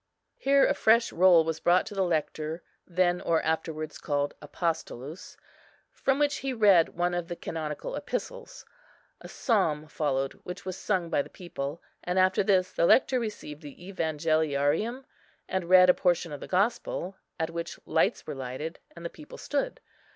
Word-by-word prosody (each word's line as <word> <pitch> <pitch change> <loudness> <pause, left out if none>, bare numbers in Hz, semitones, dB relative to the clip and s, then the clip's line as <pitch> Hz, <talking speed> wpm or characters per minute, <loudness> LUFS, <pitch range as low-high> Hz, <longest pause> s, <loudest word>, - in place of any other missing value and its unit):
Here 275 0 +4
a - - +3
fresh 230 +1 +3
roll 175 -2 +6
was 160 0 -3
brought 175 +1 +3
to - - -8
the 195 - -1
Lector, 160 -1 -2 0.2
then 180 0 +1
or 165 -1 +2
afterwards 155 -1 -2
called 145 -1 -1
Apostolus, 155 -1 -4 0.5
from 270 0 0
which 290 -1 +2
he 270 -1 -3
read 200 -9 +4
one 175 0 +1
of 175 -1 -2
the 175 - -5
canonical 160 - -5
epistles. - - -5 0.5
A - - -10
psalm 165 - +1
followed, 135 -3 -1
which 180 +2 -7
was 185 -1 -4
sung 185 -4 -1
by - - +3
the - - -9
people; 155 -4 -6 0.2
and, 180 +1 -2
after 185 +1 +4
this, 190 -2 +2
the 170 - +2
Lector 260 -1 +4
received 210 -10 -6
the 145 -2 -10 0.2
Evangeliarium, 160 - 0 0.4
and 185 -2 -2
read 185 0 +8
a 180 - +7
portion 175 -2 +1
of 145 - -6
the - - -8
Gospel, 195 -1 0 0.2
at 160 0 -1
which 170 0 -5
lights 160 - +1
were - - -5
lighted, 135 +5 -5 0.2
and 170 0 -10
the - - -2
people 300 - -12
stood. - - -2
175 Hz, 165 wpm, -28 LUFS, 155-190 Hz, 0.5 s, read